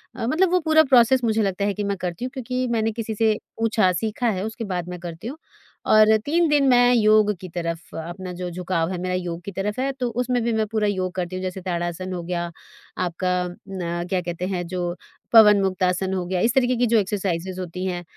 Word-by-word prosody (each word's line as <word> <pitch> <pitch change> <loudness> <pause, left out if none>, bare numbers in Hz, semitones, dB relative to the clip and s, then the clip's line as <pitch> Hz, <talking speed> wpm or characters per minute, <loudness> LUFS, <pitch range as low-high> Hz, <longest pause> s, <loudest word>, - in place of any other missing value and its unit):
अ, - - -3
मतलब 340 +7 +2
वो 365 - +4
पूरा 315 -1 +4
प्रोसेस 260 -2 +4
मुझे 220 -1 +2
लगता 200 -1 0
है 205 - 0
कि 210 - -3
मैं 200 0 -1
करती 180 +5 -4
हूँ - - -3
क्योंकि 255 -1 -2
मैंने 225 -1 +1
किसी 220 0 -4
से 220 0 +2 0.2
पूछा 220 -4 +3
सीखा 225 +2 -1
है, 190 -3 -2
उसके 220 +2 -5
बाद 175 -1 -3
मैं 180 0 -6
करती 170 +3 -7
हूँ। 275 +5 -6 0.6
और 215 0 +7
3 335 +3 +2
दिन 290 -2 +3
मैं 245 -1 +5
योग 215 -2 +4
की 185 - -7
तरफ 170 -1 -4
अपना 175 +3 -6
जो 180 0 -5
झुकाव 175 -1 -1
है 185 - -3
मेरा 185 0 -2
योग 175 -2 -4
की 200 - -6
तरफ 200 +3 -3
है, 270 +1 0
तो 260 -2 -3
उसमें 245 +1 -1
भी 235 0 0
मैं 220 0 +1
पूरा 215 0 0
योग 185 -2 -1
करती 180 0 -3
हूँ। 185 - -4
जैसे 185 0 -4
ताड़ासन 175 0 -3
हो 180 - -3
गया, 175 0 -3 0.5
आपका 180 0 -1 0.2
न 175 -1 -5
क्या 185 -2 0
कहते 175 0 -4
हैं 180 -2 -2
जो 175 -1 -3 0.4
पवनमुक्तासन 190 -4 +4
हो 185 -2 -2
गया, 180 +1 -1
इस 230 +3 +2
तरीके 255 -1 +3
की 245 - +3
जो 230 0 +3
एक्सरसाइज़ेस 190 -3 -2
होती 180 +1 -5
हैं, 175 -2 -3
195 Hz, 225 wpm, -23 LUFS, 180-230 Hz, 0.6 s, और